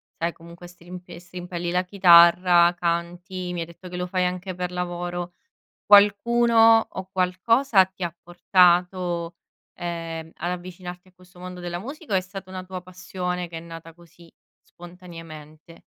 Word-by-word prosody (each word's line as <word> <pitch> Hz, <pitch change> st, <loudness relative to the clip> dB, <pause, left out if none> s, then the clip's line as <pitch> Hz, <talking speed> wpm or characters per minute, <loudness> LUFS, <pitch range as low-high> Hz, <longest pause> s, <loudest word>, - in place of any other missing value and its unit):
sai 170 Hz, +1 st, -2 dB
comunque 170 Hz, +1 st, -14 dB
strimpe 175 Hz, 0 st, -12 dB
strimpelli 175 Hz, 0 st, -6 dB
la 180 Hz, +1 st, +1 dB
chitarra, 175 Hz, -1 st, +6 dB
canti, 175 Hz, +2 st, -3 dB
mi 175 Hz, -, -4 dB
hai 165 Hz, -, -3 dB
detto 170 Hz, +2 st, -13 dB
che 180 Hz, -, -8 dB
lo 180 Hz, -, -2 dB
fai 180 Hz, 0 st, -1 dB
anche 180 Hz, +1 st, -5 dB
per 180 Hz, 0 st, -4 dB
lavoro, 175 Hz, 0 st, -4 dB, 0.5 s
qualcuno 225 Hz, +2 st, +5 dB
o 190 Hz, 0 st, -8 dB
qualcosa 190 Hz, +5 st, +3 dB
ti 190 Hz, 0 st, -9 dB
ha 170 Hz, -1 st, -4 dB
portato, 175 Hz, -1 st, +1 dB, 0.4 s
ehm, 165 Hz, -2 st, -6 dB
ad 175 Hz, +1 st, -3 dB
avvicinarti 180 Hz, 0 st, -8 dB
a 185 Hz, -, -23 dB
questo 180 Hz, -1 st, -20 dB
mondo 180 Hz, 0 st, -8 dB
della 175 Hz, 0 st, -5 dB
musica 280 Hz, -, -8 dB
o -, -, +4 dB
è -, -, 0 dB
stata 185 Hz, 0 st, -10 dB
una 185 Hz, -1 st, -6 dB
tua 185 Hz, -1 st, -8 dB
passione 180 Hz, -1 st, -5 dB
che 165 Hz, -, -8 dB
è -, -, -5 dB
nata 165 Hz, 0 st, -11 dB
così 170 Hz, 0 st, -19 dB, 0.3 s
spontaneamente? 165 Hz, -3 st, -13 dB
180 Hz, 155 wpm, -24 LUFS, 170-185 Hz, 0.5 s, chitarra